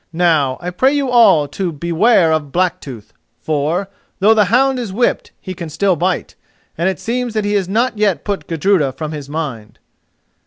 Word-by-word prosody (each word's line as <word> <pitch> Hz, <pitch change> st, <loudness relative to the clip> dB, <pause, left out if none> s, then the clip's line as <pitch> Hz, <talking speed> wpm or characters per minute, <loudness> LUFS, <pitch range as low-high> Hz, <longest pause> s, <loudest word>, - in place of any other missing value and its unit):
Now, 155 Hz, -7 st, +2 dB
I 180 Hz, +1 st, -4 dB
pray 260 Hz, +10 st, +2 dB
you 275 Hz, -3 st, -1 dB
all 200 Hz, -12 st, +5 dB
to 180 Hz, +4 st, -3 dB
beware 170 Hz, +3 st, +2 dB
of 150 Hz, -3 st, -2 dB
Blacktooth, 145 Hz, -, -3 dB, 0.3 s
for, 155 Hz, +5 st, -1 dB, 0.3 s
though 210 Hz, +3 st, +4 dB
the 215 Hz, -2 st, +3 dB
hound 255 Hz, +6 st, +2 dB
is 230 Hz, -5 st, -5 dB
whipped, 235 Hz, +5 st, 0 dB
he 185 Hz, -, -7 dB
can 170 Hz, -2 st, -7 dB
still 185 Hz, +4 st, +1 dB
bite, 180 Hz, +3 st, -2 dB, 0.4 s
and 170 Hz, +3 st, 0 dB
it 190 Hz, -, -4 dB
seems 240 Hz, 0 st, -3 dB
that 215 Hz, -1 st, 0 dB
he 205 Hz, -, -1 dB
has 195 Hz, -3 st, 0 dB
not 230 Hz, +2 st, 0 dB
yet 205 Hz, -4 st, +1 dB
put 200 Hz, -2 st, -3 dB
Gudruda 165 Hz, -4 st, +1 dB
from 155 Hz, +2 st, -6 dB
his 145 Hz, -3 st, -7 dB
mind." 140 Hz, -9 st, -5 dB
180 Hz, 185 wpm, -17 LUFS, 155-215 Hz, 0.4 s, all